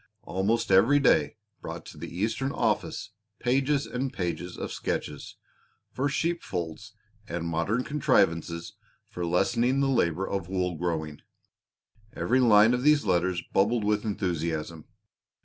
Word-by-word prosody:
Almost 100 +4 0
every 115 +10 +6
day 140 - +3 0.3
brought - - -7
to - - -11
the - - -6
Eastern 110 +9 -1
office 115 -6 -1 0.3
pages 135 +3 +1
and 130 +1 -3
pages 90 -5 -4
of - - -5
sketches - - -4 0.6
for 140 +2 -1
sheep 170 +4 -1
folds 90 +5 -5 0.3
and 85 -1 -3
modern 85 +9 0
contrivances 85 - +1 0.4
for 90 -1 -3
lessening 120 +9 +2
the 140 - +2
labor 95 -7 +1
of 95 -3 -3
wool 90 -1 -1
growing. 80 -3 -3 0.9
Every 125 +3 +1
line 110 -2 +6
of 125 - 0
these 150 -2 +4
letters 90 -1 +1
bubbled 110 +3 +2
with 105 0 +1
enthusiasm. 85 -6 -3
100 Hz, 130 wpm, -27 LUFS, 85-125 Hz, 0.9 s, every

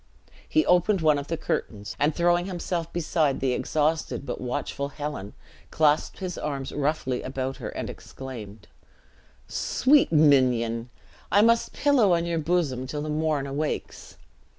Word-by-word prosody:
He 315 - +3
opened 180 +2 +3
one 155 -2 +4
of 140 - -7
the 165 - -2
curtains, 105 -8 -3
and 150 +1 +2
throwing 175 +1 +2
himself 175 -2 -3
beside 155 -4 0
the 130 -2 +1
exhausted, 155 +1 -1
but 125 - -5
watchful 140 +2 -3
Helen, 145 -9 -6 0.3
clasped 150 -1 +2
his 185 -2 -5
arms 140 -3 -4
roughly 145 -3 -1
about 130 0 -4
her, - - -5
and - - -5
exclaimed, 110 -7 -9 0.8
"Sweet 280 - +3
minion, 125 -6 +3 0.4
I 205 - +5
must 230 +1 +3
pillow 255 -10 +3
on 170 0 -1
your 170 -1 -1
bosom 150 -6 0
till 145 +2 -4
the 155 - -4
morn 150 -2 0
awakes!" 145 +2 -4
150 Hz, 145 wpm, -26 LUFS, 135-170 Hz, 0.8 s, I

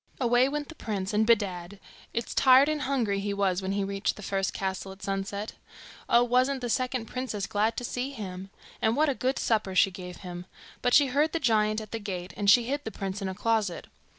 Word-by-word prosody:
Away 245 +1 +3
went 295 0 -3
the - - -10
prince, 205 -8 -4
and 215 +1 +2
bedad! 200 -4 +1 0.3
it's 235 - -3
tired 265 +1 +6
and 305 -1 -1
hungry 245 -8 0
he 200 0 -2
was 195 -2 +1
when 190 +1 -2
he 200 0 0
reached 195 0 -1
the 210 - -10
first 195 -1 -1
castle, 190 0 -4
at 190 +1 -13
sunset. 200 +2 -3 0.6
Oh, 240 - +6
wasn't 255 +2 +2
the 245 -1 -2
second 255 -1 -1
princess 225 -5 -4
glad 215 +2 0
to - - -3
see 245 +2 -3
him! 195 -7 -7 0.3
And 220 +1 +2
what 305 +2 +3
a - - +2
good 260 +1 -1
supper 210 -4 0
she 195 +1 +5
gave 180 -1 -8
him. 175 0 -7 0.3
But 245 -1 +3
she 290 - +7
heard 290 +4 +1
the 330 - 0
giant 215 -5 +2
at 215 - -10
the 225 - -3
gate, 185 -3 -5
and 200 -1 +1
she 240 +3 +7
hid 285 +5 -2
the - - -4
prince 195 0 -5
in 195 - -2
a 190 - -5
closet. 215 -4 0
215 Hz, 225 wpm, -28 LUFS, 195-250 Hz, 0.6 s, she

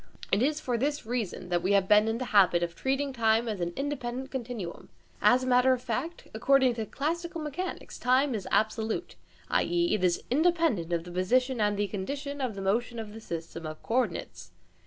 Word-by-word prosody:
It 200 - +3
is 295 +4 +1
for 245 -5 -1
this 290 +1 -1
reason 220 -6 -3
that 175 -1 +1
we 190 +3 +1
have 195 -1 +3
been 210 +1 +5
in 225 +1 0
the 255 - -3
habit 180 -4 +5
of 170 -1 -2
treating 270 +1 -1
time 225 -1 +2
as 210 -5 -3
an 175 0 -1
independent 265 -2 -3
continuum. 235 -9 -5 0.3
As 255 +1 +5
a - - -2
matter 255 +1 +4
of 250 - -2
fact, 320 +9 -4
according 260 +3 +4
to 225 -2 -4
classical 335 - -3
mechanics, 310 +5 -5
time 255 +2 +3
is 210 -4 -4
absolute, 220 +7 0 0.4
i.e. 345 0 +2
it 210 - 0
is 175 -1 +2
independent 315 - +2
of 170 -1 0
the 175 - -10
position 245 +7 +1
and 205 -1 +2
the 205 - +1
condition 280 +9 -4
of 240 -6 -2
motion 225 +5 0
of 215 -2 -6
the 225 - -9
system 165 -3 -6
of 155 0 -8
co - - -4
ordinates. 95 - -2
235 Hz, 200 wpm, -29 LUFS, 200-270 Hz, 0.4 s, been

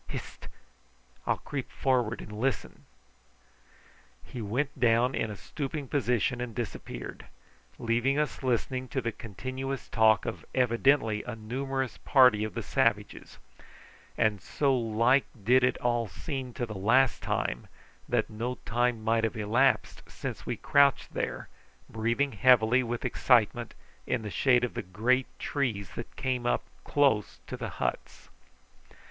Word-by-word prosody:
Hist! - - -8 0.8
I'll - - +2
creep 135 -3 -5
forward 125 -4 0
and - - -10
listen." 115 +3 -3 1.4
He 120 - -8
went 130 +7 -2
down 120 +1 +3
in 110 - -1
a 105 - -5
stooping 140 - -5
position 125 -2 0
and 125 -2 -5
disappeared, 110 - -6 0.5
leaving 120 +4 +1
us 150 0 -1
listening 130 0 -1
to 130 - -2
the 115 -1 -2
continuous 130 +6 -5
talk 110 -2 +4
of 115 - -5
evidently 120 -3 +3
a 120 - -6
numerous 130 +2 -3
party 125 -6 +5
of 110 -3 -4
the - - -3
savages; - - -1 0.8
and 105 -3 +1
so 140 -2 +1
like 115 +3 +2 0.2
did 125 +4 +4
it 125 - +2
all 120 -2 0
seem 130 - -5
to 120 - -2
the 110 - -7
last 115 +7 +3
time, - - -2 0.4
that - - +1
no 115 +4 -4
time 120 -1 0
might 115 +1 +2
have 115 0 -1
elapsed 115 +6 +2
since - - -6
we - - -2
crouched 140 -1 +3
there, - - -3 0.4
breathing 120 +5 0
heavily 120 +2 +5
with 120 -1 -4
excitement 120 -1 +2 0.3
in 120 -3 -1
the 105 - -5
shade 125 +1 +3
of 125 - -1
the - - -3
great 115 +8 +1
trees 115 -9 -2
that 120 - -8
came 125 -2 -1 0.4
close 135 -8 +2
up - - -33
to - - -6
the - - -5
huts. - - -4
120 Hz, 140 wpm, -29 LUFS, 110-130 Hz, 1.4 s, party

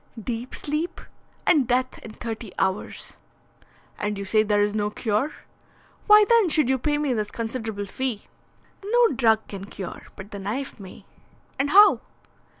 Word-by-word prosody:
"Deep 235 +2 -5
sleep, 300 +4 -3 0.5
and 290 -8 +4
death 255 +1 0
in 225 - -10
thirty 225 -3 -6
hours." 190 +1 -3 0.8
"And 210 0 -2
you 200 - -5
say 215 +2 +3
there 210 -1 +1
is 205 0 0
no 210 -1 0
cure. 220 +6 -1 0.8
Why 420 0 +8
then 460 -6 +4
should 305 -5 +4
you 265 0 +2
pay 295 +3 0
me 295 -3 0
this 215 -3 -2
considerable 225 -3 -4
fee?" 240 +1 -3 0.6
"No 470 +3 +4
drug 225 -5 +2
can 195 -1 -7
cure, 195 -2 -8
but 195 +2 -11
the 200 - -6
knife 230 +7 -4
may." 190 -2 -12 0.5
"And 280 +1 +1
how?" 410 +5 +7
230 Hz, 155 wpm, -24 LUFS, 210-285 Hz, 0.8 s, Why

